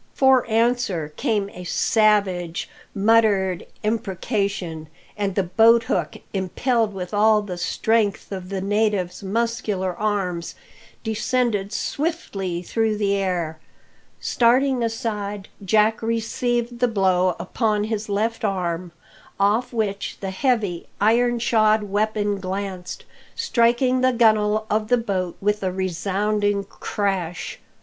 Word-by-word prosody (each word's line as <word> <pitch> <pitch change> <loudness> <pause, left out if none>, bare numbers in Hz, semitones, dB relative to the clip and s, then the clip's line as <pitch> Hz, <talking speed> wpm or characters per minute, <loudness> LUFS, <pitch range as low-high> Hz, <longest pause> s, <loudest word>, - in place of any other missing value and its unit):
For 265 -2 +4
answer 225 -9 +1
came 215 - 0
a 180 - -9
savage, 190 -4 +1 0.3
muttered 200 -3 +3 0.2
imprecation; 195 -6 -2 0.3
and 200 -2 -2
the 195 - +2
boathook, 220 -2 +3 0.2
impelled 220 +4 0
with 185 0 -6
all 210 0 +4
the 190 -3 -5
strength 210 +4 0
of 185 -2 -6
the 195 -1 -3
native's 205 -2 0
muscular 205 -3 -1
arms, 185 -4 -2 0.5
descended 220 -2 0
swiftly 200 - -3
through 220 +2 0
the 200 -1 +1
air. 175 -5 -2 0.6
Starting 255 +2 +2
aside, 210 -4 -3
Jack 215 +3 +3
received 235 +1 -1
the 245 - +3
blow' 185 -4 +2
upon 210 +4 0
his 215 -1 -3
left 220 +3 -1
arm, 180 -4 -2 0.5
off 215 +5 +2
which 205 -4 -2
the 195 -1 -4
heavy, 205 -5 0
iron 240 +3 +3
shod 220 -2 +3
weapon 205 0 0
glanced, 190 -1 -5 0.3
striking 245 +2 +2
the 255 0 +3
gun'le 215 -2 +3
of 215 0 0
the 245 +2 +4
boat 190 -6 -2
with 210 +1 0
a 190 -1 -1
resounding 200 +3 0
crash. 195 -4 -3
210 Hz, 115 wpm, -23 LUFS, 190-225 Hz, 0.6 s, For